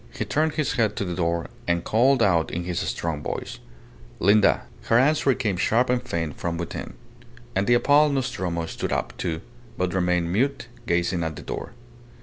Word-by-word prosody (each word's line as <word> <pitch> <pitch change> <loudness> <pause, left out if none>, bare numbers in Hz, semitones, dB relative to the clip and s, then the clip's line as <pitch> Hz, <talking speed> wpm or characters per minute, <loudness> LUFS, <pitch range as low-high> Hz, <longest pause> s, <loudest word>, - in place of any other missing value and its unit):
He - - -4
turned 155 +1 +1
his 155 -3 0
head 110 -5 +1
to 100 - -2
the 90 - -3
door, 85 -1 0 0.2
and 85 0 +1
called 125 +4 +3
out 85 -5 +3
in 85 - -3
his 90 -1 -2
strong 80 -3 -2
voice - - -5 0.6
"Linda." 100 +3 +4 0.2
Her 115 - +4
answer 140 0 +3
came 105 -8 -1
sharp 120 +7 +2
and 125 -1 +1
faint 80 - -3
from 85 -1 -2
within; 85 0 -5 0.6
and 95 +1 +1
the 120 - +5
appalled 145 +4 +4
Nostromo 95 -11 -2
stood - - -4
up, - - -2
too, 80 -2 -2 0.4
but 90 -1 -1
remained 90 -2 +1
mute, 130 +4 0 0.2
gazing 85 0 +1
at 80 -1 -3
the - - -9
door. - - -6
95 Hz, 180 wpm, -24 LUFS, 85-125 Hz, 0.6 s, the